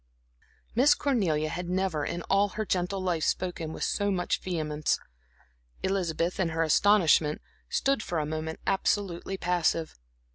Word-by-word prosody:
Miss 275 +5 +5
Cornelia 175 - +1
had 175 +2 -4
never 180 -5 0
in 170 +3 -3
all 200 +1 +2
her 215 - -1
gentle 185 +1 -1
life 175 -4 0
spoken 175 -3 -1
with - - -5
so 205 -1 0
much 180 -3 0
vehemence. 155 -4 -1 0.9
Elizabeth, 180 -2 -1
in 180 -3 +1
her 165 0 0
astonishment, 165 -3 +4 0.3
stood 275 -4 +1
for 175 - -3
a 155 - 0
moment 155 +1 -4
absolutely 195 -1 0
passive. 170 -3 0
175 Hz, 140 wpm, -28 LUFS, 160-195 Hz, 0.9 s, Miss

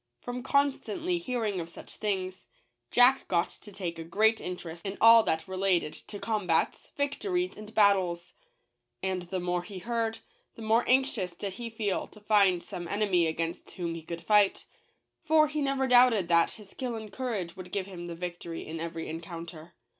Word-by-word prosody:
From 245 0 -5
constantly 285 +6 0
hearing 235 - -2
of 165 -1 -5
such - - -11
things, 190 -3 -3 0.4
Jack 250 +2 +5
got 170 -1 +1
to 210 - -12
take 180 -4 -5
a - - -4
great 220 +7 +2
interest 170 -2 -6
in 195 -1 -4
all 230 0 +9
that 160 +2 0
related 185 -4 +1
to 205 - -9
combats, 200 -7 0
victories, 355 +6 -1
and 215 0 -10
battles. 185 -5 +3 0.7
And 190 -1 -1
the 180 +1 -4
more 175 0 -1
he 195 +2 -9
heard, 225 +3 -1 0.4
the 225 - -9
more 225 +2 +3
anxious 250 -9 +2
did 195 +2 -5
he 235 +4 -6
feel 215 -4 -2
to 215 - -16
find 200 -4 +3
some 175 -1 -6
enemy 195 -4 +2
against 165 +1 -3
whom 170 -2 -3
he 165 - -6
could 170 +1 -7
fight; 205 0 +3 0.6
for 310 -1 +5
he 300 0 -2
never 275 -1 +1
doubted 245 -7 +5
that 170 -1 +4
his 210 -3 -13
skill 250 -3 -4
and 215 -2 -8
courage 210 -10 -3
would 185 -1 -9
give 195 -2 -1
him 175 -3 -8
the 170 - -5
victory 175 -1 -6
in 160 +1 -6
every 165 0 -4
encounter. 165 0 -8
195 Hz, 175 wpm, -29 LUFS, 175-230 Hz, 0.7 s, all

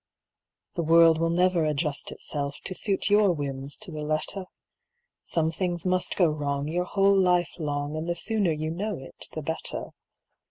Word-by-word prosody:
The 170 - -1
world 165 0 +6
will 165 0 +2
never 180 0 +3
adjust 150 -1 -1
itself 140 -1 -4
To 185 - -3
suit 200 +1 +1
your 205 -2 +5
whims 140 -2 -5
to 215 -4 -9
the 155 -1 -5
letter. 155 +5 -2 0.8
Some 160 -1 +1
things 175 0 -2
must 185 0 +1
go 180 - +4
wrong 145 -1 -2
your 175 +3 -1
whole 195 +1 +3
life 180 -4 +3
long, 145 -1 -2
And 160 +2 -3
the 175 - 0
sooner 205 -1 +1
you 155 +1 -2
know 200 +4 -3
it 130 - -9
the 155 - -5
better. 160 +2 -4
165 Hz, 170 wpm, -27 LUFS, 150-185 Hz, 0.8 s, world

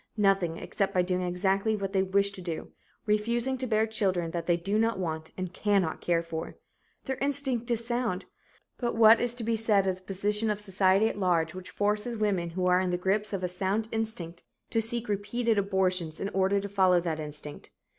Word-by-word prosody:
Nothing, 195 -5 +2
except 195 -2 -2
by 180 - +4
doing 180 0 -1
exactly 190 +4 +1
what 195 -1 -4
they 190 - +3
wish 200 +1 +1
to 195 - -10
do 170 -3 -5 0.3
refusing 235 +5 +1
to 255 - -2
bear 220 -1 +2
children 190 -6 0
that 170 -1 -4
they 175 -1 +3
do 195 +5 -1
not 225 -1 +1
want 160 -3 -4
and 185 -1 -4
cannot 195 -6 0
care 170 -1 +1
for. 165 -1 -6 0.5
Their 265 -1 -2
instinct 270 -4 0
is 235 -1 0
sound 240 -6 -1 0.5
but 240 -2 -1
what 225 0 +7
is 240 0 +3
to 240 - -2
be 230 +1 0
said 215 -3 +3
of 190 -1 0
the - - -19
position 205 +3 -1
of 210 -1 -1
society 195 +1 +2
at 205 - -4
large, 170 -4 +1
which 185 0 -9
forces 210 +3 -1
women 195 -5 0
who 180 +2 -2
are 180 0 +4
in 185 - -1
the 175 - 0
grip 195 +4 0
of 195 -3 -3
a - - +1
sound 195 +5 -1
instinct 215 -7 -2 0.3
to 225 - +2
seek 235 +1 -2
repeated 210 +2 0
abortions 185 -5 0
in 195 - -2
order 195 +1 +1
to 200 - -4
follow 190 -3 +3
that 165 -2 -3
instinct? 150 -1 -7
195 Hz, 205 wpm, -28 LUFS, 180-220 Hz, 0.5 s, what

